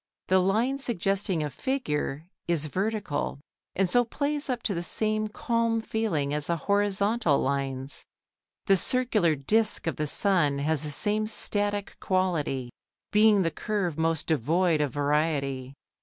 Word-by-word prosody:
The 190 0 +5
line 225 +9 +1
suggesting 195 - -1
a 150 - -2
figure 155 - -2 0.2
is 165 -3 0
vertical 195 -3 -2 0.4
and 190 0 +2
so 245 +7 +3
plays 285 +4 -2
up 245 -2 -2
to 205 - 0
the 170 - -2
same 215 +4 0
calm 230 +1 0
feeling 210 -11 -1
as 150 -1 -1
the 170 - +1
horizontal 200 -2 +1
lines. 135 0 -3 0.6
The 195 - +4
circular 215 -6 +2
disc 210 +10 +1
of 165 - -2
the 150 - -1
sun 165 -5 +2
has 150 +1 0
the 150 - -2
same 210 +7 +1
static 205 -1 -1
quality, 160 -9 -1 0.4
being 210 -2 +5
the 165 - 0
curve 195 -6 -2
most 160 -1 0
devoid 160 +3 +1
of 145 -3 0
variety. 140 -2 -1
185 Hz, 140 wpm, -27 LUFS, 150-215 Hz, 0.6 s, The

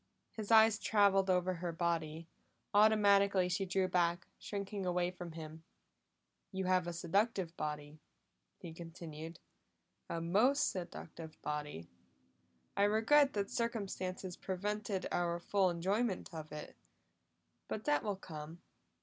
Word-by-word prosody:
His 215 -2 -6
eyes 220 -1 +7
traveled 200 -2 +3
over 185 0 +2
her 175 0 -3
body; 165 -1 -2 0.5
automatically 200 -3 +5
she 190 +1 -1
drew 190 0 +1
back, 175 -1 +1
shrinking 200 -1 -4
away 180 0 0
from 175 -2 -8
him. 160 0 -8 0.9
"You 190 -1 -2
have 185 -1 +2
a - - -1
seductive 180 +1 0
body," 150 0 -5 0.6
he 165 - -9
continued. 165 -1 -8 0.7
"A 170 - -2
most 215 - +3
seductive 165 -3 -7
body; 150 - -4 0.9
I 200 - +4
regret 250 +7 +4
that 200 -1 -2
circumstances 190 -5 -3
prevented 200 +1 -3
our 175 -1 0
full 190 +1 +2
enjoyment 190 +4 -1
of 155 -1 -7
it. 150 0 -8 0.9
But 215 - -4
that 295 0 +2
will 205 -2 -1
come. 160 -2 -9
185 Hz, 125 wpm, -35 LUFS, 165-205 Hz, 0.9 s, eyes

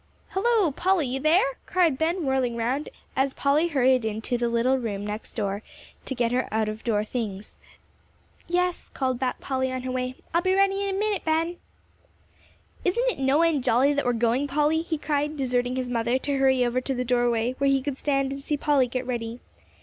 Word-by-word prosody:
"Halloo, 415 -4 +2
Polly, 365 +2 +1
you 260 +1 -2
there?" 330 - +4 0.2
cried 335 -7 +2
Ben, 335 +1 0
whirling 260 -3 +1
round, 255 +6 -1 0.3
as 270 0 +1
Polly 290 +4 +2
hurried 260 -5 +3
into 220 +3 -2
the 240 0 0
little 245 +3 +2
room 205 -4 -3
next 210 +1 -6
to 200 -2 -2 0.5
get 235 -1 +1
her 250 0 0
out 220 0 +1
of 215 +1 -5
door 210 -3 +1
things. 215 -3 -5 0.9
"Yes," 360 0 0
called 260 -2 -1
back 255 -1 -1
Polly, 260 -1 -1
on 255 0 -4
her 255 - -3
way, 255 0 -2 0.2
"I'll 340 - +3
be 375 +1 +2
ready 390 0 +2
in 385 - -1
a - - -2
minute, 420 -1 0
Ben." 325 +2 0 1.3
"Isn't 475 +7 +2
it - - -9
no 275 +4 +3
end 315 -6 +2
jolly 260 +6 +3
that 285 - 0
we're 245 - +2
going, 235 +4 +1
Polly?" 300 +3 +2
he 325 -1 -3
cried, 295 0 -1
deserting 250 -2 0
his 255 -1 -2
mother 235 +1 0
to 280 +1 -2
hurry 265 -2 +4
over 245 +1 0
to 270 +1 -2
the 250 0 -2
doorway 240 -1 +1
where 275 0 +3
he 275 0 +3
could 275 0 -3
stand 275 -2 0
and 275 - -7
see 295 +1 -1
Polly 280 -3 +2
get 255 +1 -3
ready. 235 -1 -4
265 Hz, 200 wpm, -25 LUFS, 245-305 Hz, 1.3 s, there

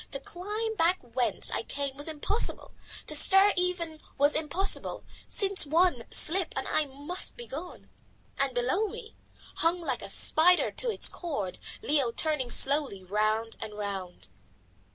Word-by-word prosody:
To 275 - -4
climb 420 +8 -5
back 345 +2 +2
whence 245 0 +1
I - - -2
came 280 -1 -5
was 290 +2 -5
impossible, 320 +8 -3 0.3
to - - -5
stir 390 +1 +7
even 350 -3 -3 0.2
was 290 +1 +3
impossible, 350 +6 +2 0.2
since 395 -2 +5
one 315 -4 +1
slip 365 +4 +4
and - - -4
I 310 - 0
must 290 +7 -5
be 480 - -9
gone. 345 - -9 0.5
And 270 -2 -1
below 260 - 0
me, 440 +1 -11 0.4
hung 335 +2 0
like 335 - -4
a - - -8
spider 355 +3 +3
to - - -1
its 450 - +3
cord, 280 - -5 0.2
Leo 280 -4 +1
turning 300 -1 -2
slowly 270 -7 +2
round 215 +4 -2
and 210 -1 -8
round! 195 - -7
305 Hz, 150 wpm, -27 LUFS, 250-360 Hz, 0.5 s, stir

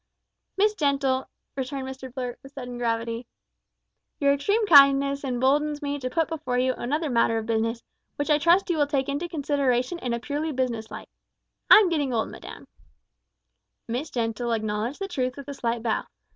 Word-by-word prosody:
"Miss 420 +2 +3
Gentle," 275 -6 0 0.3
returned 265 0 -4
Mr 265 -1 -8
Blurt, 250 -1 -5
with 270 +1 -14
sudden 245 -3 -7
gravity, 230 0 -2 0.9
"your 280 -1 +4
extreme 405 +11 +1
kindness 280 -3 +6
emboldens 285 +4 +1
me 285 0 -2
to 255 -1 -3
put 325 +5 0
before 310 -6 -3
you 255 +1 +2
another 300 +7 -2
matter 230 -3 +2
of 220 - -3
business, 230 +1 -1 0.3
which 290 +1 -1
I 300 - +4
trust 345 +4 +3
you 335 - 0
will 290 - +3
take 275 -2 0
into 295 +5 -2
consideration 280 0 0
in 250 - -3
a 235 - -1
purely 295 +5 -3
business 240 -4 -2
light. - - -9 0.6
I - - +11
am 415 -4 +5
getting 295 -6 0
old, 220 - 0
madam." - - -11 1.2
Miss 245 +7 -3
Gentle 235 0 -2
acknowledged 220 +4 -2
the 390 - -4
truth 255 -8 -2
with 280 - -9
a 285 - -5
slight 235 -3 -2
bow. 225 -2 0
270 Hz, 175 wpm, -25 LUFS, 240-295 Hz, 1.2 s, I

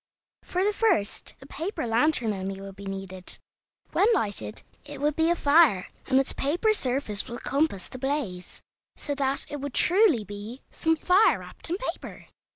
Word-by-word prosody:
For 365 +1 -1
the 415 +1 +2
first 390 - 0
a - - -12
paper 325 - -4
lantern 235 -1 +2
only 195 0 -4
would 195 -1 -9
be 200 0 -9
needed. 195 -1 -4 0.5
When 405 - +3
lighted 110 - -3 0.2
it 290 -1 -9
would 295 +1 +1
be 320 0 +2
a 345 - +3
fire, 285 - +4 0.2
and 265 0 +4
its 270 - +1
paper 345 +10 +1
surface 255 - -1
would 235 - -7
compass 275 - 0
the 255 - -9
blaze, 250 -10 -3 0.3
so 290 - -3
that 275 -1 0
it 290 -2 -6
would 285 -2 -5
truly 355 - +4
be 205 +5 -8
"some 325 0 +1
fire 370 +6 +4
wrapped - - -4
in 350 - 0
paper." - - -6
275 Hz, 170 wpm, -26 LUFS, 205-320 Hz, 0.5 s, fire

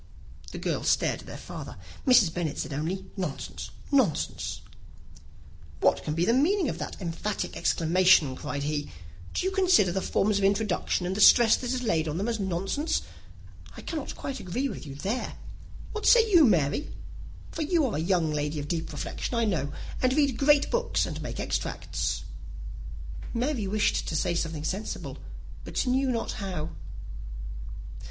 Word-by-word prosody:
The - - -6
girls - - -1
stared - - +2
at - - -15
their - - -7
father. - - -8 0.3
Mrs. 225 -10 +6
Bennet 160 -4 -2
said 155 - -3
only, 160 +7 -2
"Nonsense, 190 -3 -4 0.2
nonsense!" 260 - +1 1.2
"What - - +3
can 150 - -2
be 170 +2 +2
the 230 - +3
meaning 320 +5 +3
of - - -4
that - - -5
emphatic 190 +3 -3
exclamation?" 165 -4 +4
cried 140 +2 -4
he. 145 0 -2 0.5
"Do - - 0
you 380 - +1
consider 365 - +4
the 190 +2 -1
forms 200 +2 +1
of - - -2
introduction, 195 -2 +1
and 185 +2 -1
the 210 - 0
stress 230 +1 +8
that 250 -1 -3
is 255 -1 -1
laid 165 -8 +1
on 155 +1 -2
them, 200 +5 -1
as 230 -2 -1
nonsense? 195 - -1 0.7
I - - -7
cannot 310 -5 -4
quite 275 -2 -5
agree 220 +9 -2
with 165 - -7
you 135 - -7
there. 205 - -3 0.6
What 430 - -2
say 460 -2 +7
you, 340 -5 +8
Mary? 175 - +2 0.6
For 320 - -4
you 315 0 +2
are 245 - -1
a - - -1
young 170 -2 +1
lady 150 +1 -1
of 145 - -5
deep 165 -1 -2
reflection, - - -4
I 230 -1 +2
know, 155 -9 0 0.3
and 255 0 +3
read 280 -3 +3
great 285 +2 +4
books, 485 0 +1
and - - -5
make - - -5
extracts." - - -2 1.1
Mary 240 -3 0
wished 215 +1 +1
to 160 - -2
say 175 +3 +1
something 165 -3 -2
very 155 - 0
sensible, 200 +3 -5 0.4
but - - -2
knew 260 +1 +2
not 230 -2 -1
how. 180 -5 -4
200 Hz, 170 wpm, -28 LUFS, 165-260 Hz, 1.2 s, stress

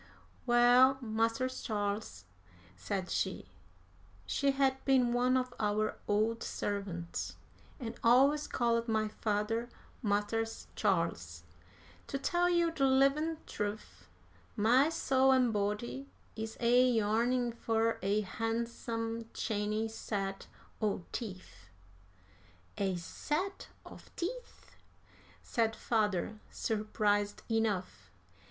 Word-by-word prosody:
"Well, 245 +2 +6
Mars' 230 +2 -1
Charles," 205 - -3 0.5
said 185 - -4
she - - -1 0.8
(she 280 - +1
had 270 -1 +1
been 255 -3 +3
one 250 +1 +3
of 255 -1 -2
our 215 0 0
old 220 +3 +1
servants, 190 -4 -4 0.4
and 230 -4 -4
always 275 +5 +5
called 235 -1 +1
my 220 -1 +1
father 215 +2 -1 0.3
'Mars' 220 +1 -1
Charles'), 165 - -1 0.6
"to - - -2
tell 350 +5 +1
you 340 -1 +3
de 295 -4 -2
livin' 275 +4 +3
trufe, 210 +1 -5 0.5
my 245 +8 +4
soul 265 -5 +3
an' 250 -2 +3
body 210 +6 -2 0.3
is 220 0 -5
a 245 +2 +5
yearnin' 235 +2 +2
fur 225 0 0
a 200 +3 +1
han'sum 225 +1 -3
chany 215 0 -1
set 195 -3 -4 0.3
o' 205 -4 0
teef." 185 - -7 1.1
"A 195 -2 +1
set 305 - -3 0.2
of - - -13
teeth!" 485 +8 -6 0.7
said 225 -1 0
father, 215 -2 0
surprised 210 -1 0
enough. 200 - -1
225 Hz, 100 wpm, -32 LUFS, 205-255 Hz, 1.1 s, Well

